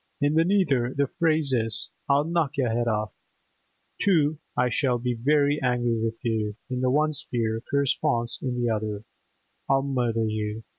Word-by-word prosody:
in 145 0 +2
the 160 +1 +4
nether 155 -10 +1
the 140 +1 +2
phrase 155 -2 +1
is, 115 -3 +3 0.2
'I'll 140 +1 +4
knock 165 -4 -1
yer 135 - +2
'ed 120 +1 0
orff!' 105 -1 -1 0.9
To 155 -6 +2 0.2
'I 125 0 +2
shall 125 0 +1
be 125 +1 -2
very 145 +4 +2
angry 120 -2 0
with 115 0 -2
you' 110 -3 -1 0.2
in 125 0 -2
the 130 - +2
one 155 +3 +2
sphere, 115 -5 -2
corresponds 130 -4 0
in 125 -2 -2
the 120 - 0
other, 105 -2 -2 0.7
'I'll 135 0 +3
murder 120 -5 0
you! 110 0 -3
125 Hz, 165 wpm, -25 LUFS, 115-145 Hz, 0.9 s, the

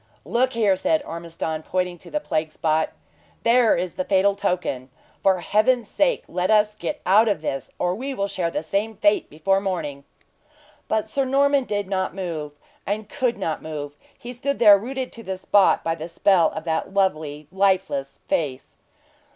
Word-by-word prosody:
"Look 255 +2 +1
there," 215 -4 +3
said 160 -3 +1
Ormiston 165 -1 -5
pointing 180 +1 -2
to - - -13
the 300 - -1
plague 160 - -2
spot. 155 0 0 0.5
"There 235 -1 +4
is 180 0 -2
the 185 - -2
fatal 195 +1 +3
token! 180 -10 -2 0.3
For 190 -2 +3
Heaven's 215 +4 +2
sake 280 +3 +1
let 180 +1 -1
us 210 -1 +4
get 285 +7 -5
out 210 +5 +5
of 200 -8 0
this, 135 -4 -3
or 180 0 0
we 265 +7 -4
will 200 -3 -1
share 180 -3 -1
the 165 - -3
same 200 +7 -1
fate 205 0 +2
before 195 +6 +1
morning!" 160 -8 -3 0.8
But 220 -1 0
Sir 270 +5 -1
Norman 275 +1 +2
did 205 -3 -2
not 190 -1 -2
move 165 -6 -4 0.6
could 255 -4 -1
not 165 -6 -3
move; 145 -2 -6 0.2
he 245 +1 -8
stood 280 +3 -2
there 210 -3 +8
rooted 255 +5 -4
to 230 - -8
the 190 -2 -4
spot 195 +1 +3
by 165 - 0
the 160 0 -6
spell 170 -1 +3
of - - -5
that 160 +1 -2
lovely, 155 -6 0
lifeless 185 -8 0
face. 140 -5 -2
190 Hz, 175 wpm, -23 LUFS, 160-220 Hz, 0.8 s, there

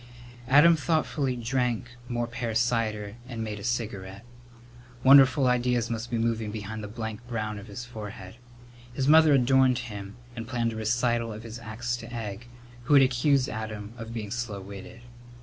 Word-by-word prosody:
Adam 150 +6 +7
thoughtfully 150 -4 0
drank 120 -1 -1 0.2
more 120 -1 -1
pear 115 -1 -4
cider 110 -3 0
and 115 -3 -4
made 105 -1 -5
a - - -9
cigarette. 105 -4 -3 0.8
Wonderful 135 0 +7
ideas 125 -1 +1
must 115 +1 -3
be 120 - -1
moving 115 -1 0
behind 105 0 -6
the - - -5
blank 110 +1 -6
brown 110 -3 -3
of 100 - -11
his 110 +4 -7
forehead. 105 -4 -9 0.6
His 135 0 0
mother 155 0 +7
adored 130 -1 +4
him 105 -4 -7 0.2
and 115 -1 -6
planned 115 -2 -1
a - - -7
recital 115 +1 0
of 110 +1 -8
his 115 0 -8
acts 120 +2 -3
to 115 0 -10
Egg, 115 -1 -6 0.4
who 145 - +4
had 135 - +8
accused 130 +1 +2
Adam 110 -1 -6
of 115 -1 -8
being 110 -3 -5
slow 120 -4 -3
witted. 100 +4 -10
115 Hz, 165 wpm, -27 LUFS, 110-125 Hz, 0.8 s, had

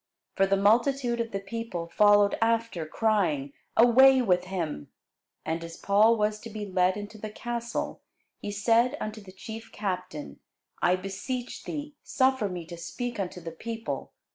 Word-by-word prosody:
For 195 - +3
the 195 0 +3
multitude 240 +4 +3
of 230 - -3
the 195 - -3
people 195 -3 -5
followed 205 +3 +5
after, 225 -7 +1
crying, 165 -10 +1 0.2
Away 260 +3 +7
with 180 -7 +2
him. 165 - -4 0.6
And 165 +1 -2
as 165 0 -8
Paul 215 +3 +4
was 210 0 0
to 230 - -9
be 215 -1 -5
led 185 0 +2
into 210 +1 -8
the 215 - -5
castle, 235 +2 -4 0.4
he - - -5
said 230 +6 +2
unto 215 0 -5
the 195 -2 -12
chief 225 +4 -9
captain, 180 -7 -4 0.4
I 180 +1 +4
beseech 200 +7 -5
thee, 295 -1 -5
suffer 260 -5 +1
me 175 -2 -5
to 170 +1 -9
speak 240 +8 -5
unto 180 -2 -3
the 165 -1 -7
people. 225 +7 -5
210 Hz, 160 wpm, -28 LUFS, 185-230 Hz, 0.6 s, Away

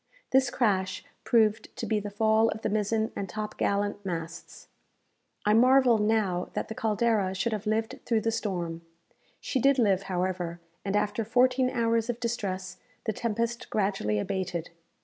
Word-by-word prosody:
This 265 -1 +4
crash 190 -6 0 0.2
proved 220 -2 +2
to 245 - -4
be 215 0 +1
the 205 0 -5
fall 220 +2 +3
of 220 - -5
the - - 0
mizen 215 +1 0
and 195 -2 -4
top 215 0 -5
gallant 205 0 -1
masts. 165 -3 -6 0.8
I 210 - +4
marvel 250 0 +5
now 210 -4 +1
that - - -3
the - - -3
"Caldera" 215 -3 +1
should 210 +5 0
have 210 0 -4
lived 220 +1 -1
through 230 -2 +1
the 225 - 0
storm. 175 -7 -3 0.6
She 265 - -1
did 275 +2 +4
live, 200 -6 +3
however, 180 -2 -2 0.2
and 200 0 -1
after 210 +2 0
fourteen 250 +3 +3
hours 230 -2 +1
of 240 -1 -2
distress, 195 -6 -3 0.3
the 220 - -1
tempest 230 +2 -2
gradually 195 - 0
abated. 175 - -3
215 Hz, 160 wpm, -28 LUFS, 190-230 Hz, 0.8 s, marvel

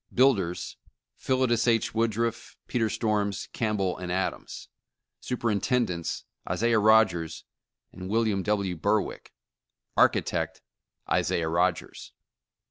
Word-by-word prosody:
BUILDERS: 105 -10 +1 0.4
Philetus 130 -3 +1
H. 115 -2 +2
Woodruff, 115 +1 -1
Peter 115 -3 0
Storms, 105 -3 -1
Campbell 105 -5 -1
& - - -11
Adams. 90 +1 -3 0.5
SUPERINTENDENTS: 115 -6 -1 0.3
Isaiah 115 -1 +2
Rogers 105 -7 +3 0.5
and 90 +1 -8
William 110 -2 +1
W. 100 -2 -1
Burwick. 100 +6 -1 0.6
ARCHITECT: - - +1 0.4
Isaiah 80 -1 +1
Rogers.' 90 +1 -1
105 Hz, 90 wpm, -27 LUFS, 95-115 Hz, 0.6 s, Rogers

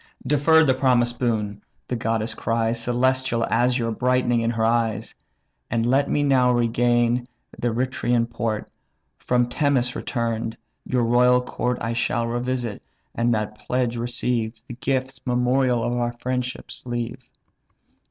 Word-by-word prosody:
"Defer 160 +3 +5
the 135 -4 +4
promised 120 -2 +2
boon 105 -4 -1 0.3
(the 125 - -2
goddess 115 -1 -1
cries, 115 0 0
Celestial 125 0 +1
azure 120 -1 +2
brightening 125 0 +1
in 115 - +1
her 115 -1 0
eyes), 115 -2 0 0.6
And 115 0 0
let 135 +3 +2
me 145 - +1
now 130 -3 +4
regain 120 0 +2 0.3
the 120 - 0
Reithrian 120 0 0
port; 115 -2 -3 0.5
From 125 -1 +1
Temese 125 -2 +1
return'd, 115 -2 -2 0.3
your 125 -2 +1
royal 125 +2 +4
court 125 0 -2
I 115 - -1
shall 115 0 0
revisit, 120 -1 -2 0.3
and 120 +1 +1
that 105 0 -3
pledge 125 -1 -1
receive; 120 -1 -2
And 120 0 -9
gifts, 130 -1 -2
memorial 125 0 +2
of 120 - -1
our 120 0 -1
friendship, 125 +1 -4
leave." 120 0 -5
120 Hz, 135 wpm, -23 LUFS, 115-125 Hz, 0.6 s, Defer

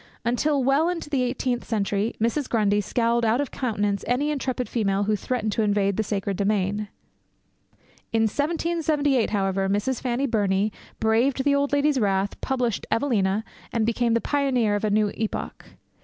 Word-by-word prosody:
Until 270 +4 +1
well 280 +6 +3
into 335 -4 -4
the 275 -3 +1
eighteenth 250 0 -1
century, 210 0 -1
Mrs. 235 +5 0
Grundy 210 -2 +2
scowled 235 +3 +1
out 230 +2 +2
of 285 - -2
countenance 205 -5 -1
any 280 +5 +1
intrepid 255 -3 -2
female 200 -4 0
who 210 +1 +1
threatened 220 0 -2
to 220 - 0
invade 200 -2 +1
the 220 - +1
sacred 200 -2 -2
domain. 205 0 0 1.2
In 225 0 +2
1778, 290 0 +1
however, 195 -1 0
Miss 210 +6 0
Fanny 250 +2 0
Burney 205 -4 +1 0.3
braved 240 +5 +2
the 285 0 +3
old 280 0 +1
lady's 285 -1 +2
wrath, 195 -2 0
published 245 -5 -1
Evelina, 220 -5 +1 0.3
and 230 -2 +1
became 235 0 +1
the 230 - +1
pioneer 260 -7 +1
of 205 - -1
a 215 - +2
new 210 0 +2
epoch. 220 -1 -4
230 Hz, 160 wpm, -24 LUFS, 205-270 Hz, 1.2 s, well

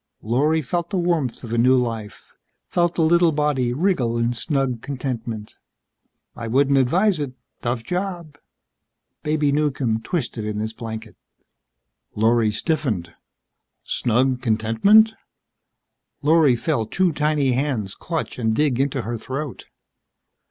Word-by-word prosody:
Lorry 150 +8 +1
felt 170 +5 -2
the 195 - -1
warmth 170 -10 0
of 115 -1 -5
a 120 - +1
new 130 +2 +5
life, 115 -3 -3 0.3
felt 175 -1 +1
the 165 - +2
little 170 +1 +4
body 145 -5 0
wriggle 130 -6 +1
in 115 +1 +1
snug 130 -1 -1
contentment. 120 -6 -5 0.8
"I 115 - -5
wouldn't 135 +3 +3
advise 175 +8 +2
it. 140 -3 -3 0.3
Tough 120 -1 -2
job." 175 -2 -4 0.8
Baby 150 -1 +1
Newcomb 140 -6 0
twisted 120 -5 -3
in 105 0 -3
his 110 +1 -3
blanket. 110 -1 -7 1.0
Lorry 115 +1 +3
stiffened. 105 - -2 0.7
Snug 125 +2 +1
contentment? 115 - +4 1.1
Lorry 150 -3 +5
felt 115 -3 -1
two 185 -2 +2
tiny 150 -3 +1
hands 125 -7 -1
clutch 165 -5 -4
and 110 -2 +1
dig 140 -3 +1
into 135 -2 0
her 115 +1 -4
throat. 135 +3 -5
130 Hz, 125 wpm, -22 LUFS, 115-155 Hz, 1.1 s, new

